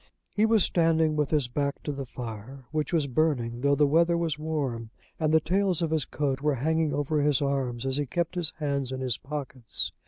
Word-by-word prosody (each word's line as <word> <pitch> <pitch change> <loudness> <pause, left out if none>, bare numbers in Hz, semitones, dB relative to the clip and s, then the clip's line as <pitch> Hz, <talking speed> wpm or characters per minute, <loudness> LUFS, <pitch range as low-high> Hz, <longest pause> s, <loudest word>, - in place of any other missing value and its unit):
He 215 +1 +3
was 220 -4 +4
standing 160 -2 +2
with 150 -2 0
his 150 -5 +2
back 140 +3 -2
to 150 - -2
the 140 -2 -5
fire, 125 +2 -8
which 155 -1 -1
was 165 -4 +2
burning 125 -4 0
though 140 +1 +3
the 150 - +4
weather 170 +4 +3
was 165 -3 -1
warm, 140 -8 -3 0.3
and 155 -2 +1
the 160 - +6
tails 180 +1 +1
of 160 - -1
his 155 -4 +1
coat 140 -2 -2
were 150 -1 +1
hanging 160 +4 +1
over 145 +2 0
his 145 -2 +3
arms 135 -4 -1
as 135 0 +1
he 145 -1 -1
kept 170 +6 -1
his 175 -4 +3
hands 140 -4 -2
in 130 0 -4
his 125 -3 -1
pockets. 135 -4 -4
145 Hz, 215 wpm, -27 LUFS, 130-160 Hz, 0.3 s, the